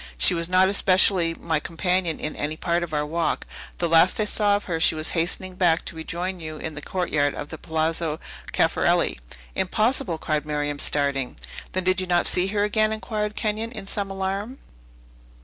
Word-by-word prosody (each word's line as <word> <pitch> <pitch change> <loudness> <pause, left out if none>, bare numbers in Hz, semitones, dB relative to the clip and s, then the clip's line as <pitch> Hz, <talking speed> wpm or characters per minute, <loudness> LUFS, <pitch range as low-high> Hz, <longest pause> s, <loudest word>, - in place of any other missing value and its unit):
She - - +6
was 170 0 -1
not 185 +1 +5
especially 185 -3 +3
my 160 -2 -1
companion 175 +1 -1
in 150 - -4
any 150 +2 -3
part 170 +1 0
of 175 -2 -4
our 150 -1 0
walk. 165 +2 -1 0.3
The 170 - 0
last 165 +4 +5
I 215 - +2
saw 205 -1 +3
of 205 - -2
her 165 -3 -3
she 160 - +4
was 155 +1 0
hastening 185 +2 0
back 175 -3 +2
to - - -6
rejoin 175 +3 -4
you 155 -1 -6
in 160 +1 -5
the 145 - -7
courtyard 150 -5 0
of 145 - -6
the 160 - -8
Palazzo 160 -1 -1 0.3
Caffarelli." - - +2 0.3
"Impossible!" 190 -1 0
cried 155 -2 -1
Miriam, 145 -1 -2
starting. 140 -3 +1 0.4
"Then 185 - -1
did 185 0 +2
you 185 - -4
not 175 -1 +2
see 180 +1 +2
her 205 +1 0
again?" 215 +1 +2
inquired 215 -1 -3
Kenyon, 220 +2 -2
in 215 -5 -7
some 200 0 -2
alarm. 195 +6 -3
175 Hz, 185 wpm, -24 LUFS, 160-195 Hz, 0.4 s, She